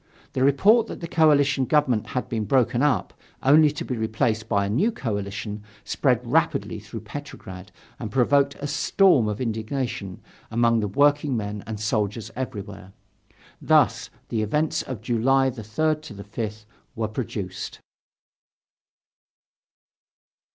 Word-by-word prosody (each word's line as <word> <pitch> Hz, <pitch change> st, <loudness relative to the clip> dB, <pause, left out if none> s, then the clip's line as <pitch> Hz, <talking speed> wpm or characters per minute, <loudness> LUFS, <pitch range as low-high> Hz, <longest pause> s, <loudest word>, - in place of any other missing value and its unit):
The 130 Hz, -, +1 dB
report 200 Hz, -, +4 dB
that -, -, -7 dB
the 170 Hz, -, -5 dB
coalition 145 Hz, -5 st, +3 dB
government 130 Hz, -7 st, +2 dB
had 125 Hz, -, -3 dB
been 110 Hz, -3 st, -2 dB
broken 125 Hz, +1 st, +2 dB
up, 145 Hz, -6 st, +1 dB, 0.3 s
only 150 Hz, +3 st, +6 dB
to 150 Hz, -, -5 dB
be 125 Hz, -, -3 dB
replaced 110 Hz, 0 st, -1 dB
by 100 Hz, -2 st, +2 dB
a -, -, -2 dB
new 145 Hz, -, +1 dB
coalition, 105 Hz, -, -4 dB, 0.2 s
spread -, -, +1 dB
rapidly -, -, 0 dB
through -, -, -8 dB
Petrograd 95 Hz, +2 st, -9 dB, 0.3 s
and 110 Hz, -, -4 dB
provoked 140 Hz, +3 st, +2 dB
a 145 Hz, -, -7 dB
storm 145 Hz, -, +3 dB
of 105 Hz, 0 st, -3 dB
indignation 110 Hz, -4 st, -3 dB, 0.3 s
among 115 Hz, 0 st, +2 dB
the 105 Hz, -, -1 dB
workingmen 130 Hz, -5 st, +1 dB
and 110 Hz, -2 st, -5 dB
soldiers 110 Hz, +1 st, -1 dB
everywhere. 105 Hz, -6 st, -6 dB, 0.7 s
Thus -, -, +3 dB, 0.2 s
the 110 Hz, -, -1 dB
events 150 Hz, +9 st, 0 dB
of 125 Hz, -5 st, -6 dB
July 130 Hz, +3 st, +2 dB
3rd 150 Hz, +7 st, -2 dB
5th 105 Hz, +1 st, -6 dB, 0.3 s
were 115 Hz, -2 st, -1 dB
produced. 105 Hz, -4 st, -5 dB
115 Hz, 125 wpm, -24 LUFS, 105-140 Hz, 0.7 s, only